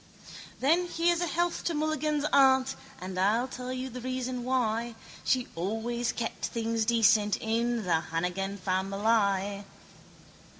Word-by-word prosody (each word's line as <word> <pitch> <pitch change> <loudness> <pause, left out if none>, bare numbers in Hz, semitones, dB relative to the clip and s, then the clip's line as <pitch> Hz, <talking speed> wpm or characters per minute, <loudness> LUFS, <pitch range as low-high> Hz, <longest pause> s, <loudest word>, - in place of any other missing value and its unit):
Then 335 +7 +3
here's 345 0 +1
a 350 - 0
health 345 +2 -1
to 335 - 0
Mulligan's 305 -1 0
aunt 265 -1 +5 0.2
And 185 0 -5
I'll 220 +6 +2
tell 250 -1 -6
you 255 0 -3
the 250 0 -7
reason 255 0 -3
why. 235 -2 0 0.3
She 255 -2 +1
always 225 +6 -2
kept 230 -1 -3
things 230 -1 -1
decent 220 -2 +4
in 230 +1 0
The 170 -3 +2
Hannigan 180 +4 -2
famileye. 200 +1 0
235 Hz, 130 wpm, -29 LUFS, 205-260 Hz, 0.3 s, aunt